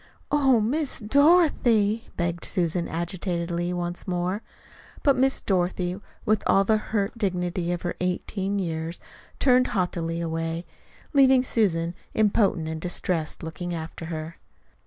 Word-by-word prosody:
"Oh, 270 Hz, -5 st, +4 dB
Miss 275 Hz, +7 st, 0 dB
Dorothy!" 235 Hz, -, +3 dB
begged 170 Hz, -1 st, -1 dB
Susan 175 Hz, -2 st, 0 dB
agitatedly, 175 Hz, 0 st, -2 dB
once 175 Hz, +1 st, -3 dB
more. 180 Hz, +3 st, -1 dB, 0.6 s
But 280 Hz, -2 st, +5 dB
Miss 265 Hz, +1 st, +2 dB
Dorothy, 180 Hz, -1 st, 0 dB, 0.3 s
with 215 Hz, 0 st, +2 dB
all 195 Hz, -, +5 dB
the 215 Hz, +2 st, +3 dB
hurt 210 Hz, -1 st, -2 dB
dignity 180 Hz, -3 st, -1 dB
of 175 Hz, -, -3 dB
her 175 Hz, -, -1 dB
eighteen 190 Hz, +2 st, -2 dB
years, 165 Hz, -2 st, -3 dB, 0.4 s
turned 255 Hz, -1 st, +4 dB
haughtily 170 Hz, -2 st, -1 dB
away, 165 Hz, 0 st, -3 dB, 0.5 s
leaving 265 Hz, -2 st, +6 dB
Susan 175 Hz, -9 st, +1 dB, 0.2 s
impotent 205 Hz, -6 st, +2 dB
and 160 Hz, 0 st, -4 dB
distressed, 175 Hz, -3 st, -1 dB
looking 170 Hz, +2 st, -4 dB
after 165 Hz, +1 st, -6 dB
her. 160 Hz, 0 st, -6 dB
180 Hz, 125 wpm, -25 LUFS, 170-215 Hz, 0.6 s, leaving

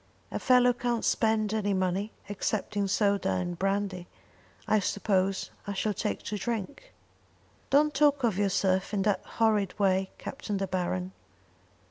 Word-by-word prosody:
A -, -, -2 dB
fellow 250 Hz, -1 st, +5 dB
can't 240 Hz, -1 st, -1 dB
spend 220 Hz, -2 st, +2 dB
any 205 Hz, -2 st, 0 dB
money, 190 Hz, +3 st, -1 dB, 0.2 s
except 205 Hz, +1 st, -2 dB
in 200 Hz, -1 st, +1 dB
soda 200 Hz, -, +1 dB
and 170 Hz, -, -3 dB
brandy. 195 Hz, -2 st, -1 dB, 0.6 s
I 215 Hz, -, +4 dB
suppose 195 Hz, -1 st, 0 dB, 0.2 s
I 200 Hz, -, -2 dB
shall 210 Hz, +2 st, -1 dB
take 210 Hz, +2 st, -3 dB
to 210 Hz, -1 st, -4 dB
drink." 235 Hz, -, -4 dB, 0.8 s
"Don't 300 Hz, +2 st, +4 dB
talk 285 Hz, -1 st, +3 dB
of 225 Hz, -5 st, +2 dB
yourself 190 Hz, 0 st, +1 dB
in 195 Hz, -, +1 dB
that 200 Hz, -2 st, +1 dB
horrid 215 Hz, -4 st, +1 dB
way, 190 Hz, -2 st, +2 dB
Captain 230 Hz, -8 st, -4 dB
De 195 Hz, -, -1 dB
Baron." 175 Hz, -, -2 dB
205 Hz, 145 wpm, -29 LUFS, 190-220 Hz, 0.8 s, fellow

